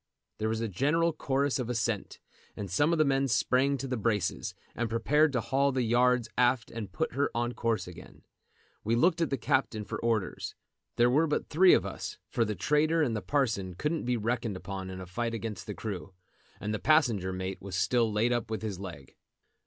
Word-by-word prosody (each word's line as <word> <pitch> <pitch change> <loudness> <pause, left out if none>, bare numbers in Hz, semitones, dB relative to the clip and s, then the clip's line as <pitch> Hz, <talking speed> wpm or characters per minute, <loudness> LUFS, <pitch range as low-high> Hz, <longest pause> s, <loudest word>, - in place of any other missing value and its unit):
There 110 0 0
was 110 0 -1
a 115 - -1
general 150 - +1
chorus 140 -2 0
of 125 -2 -3
assent, 115 -3 -2 0.4
and 100 -4 -5
some 145 - +3
of 170 - +2
the 155 - +4
men 135 0 +2
sprang 135 +3 +2
to 135 +1 -4
the 125 -1 -2
braces, 105 -3 -1 0.2
and 120 -1 -2
prepared 150 +7 +3
to 125 - +1
haul 135 +5 +1
the 130 -1 0
yards 120 0 +3
aft 125 -1 +2
and 115 -3 -6
put 160 +1 -2
her 140 +2 +1
on 120 +1 0
her - - -9
course 115 -6 -1
again. 90 -2 -12 0.6
We 115 +2 +1
looked 165 +7 +3
at 165 - +1
the 135 - -1
captain 110 -3 0
for - - -5
orders. 115 -5 -1 0.4
There 120 +1 +4
were 155 +5 +3
but 150 - -1
three 180 +4 +6
of 95 - 0
us, 95 -1 -5
for 115 - +2
the 105 -1 -2
trader 155 +5 +2
and 120 -6 0
the 105 - -2
parson 110 -11 0
couldn't 150 - -2
be 125 0 +1
reckoned 115 -2 -1
upon 95 -1 -6
in 95 0 -7
a 95 - -6
fight 115 +6 -3
against 105 -4 -5
the 105 - -5
crew, 95 -4 -6 0.4
and 105 +2 -3
the 105 - -2
passenger 120 - +3
mate 95 +1 -4
was 95 -1 -6
still 115 +4 +2
laid 115 +4 +2
up 120 -2 -2
with 110 0 -3
his 100 -4 -4
leg. 85 -9 -9
115 Hz, 215 wpm, -29 LUFS, 105-135 Hz, 0.6 s, three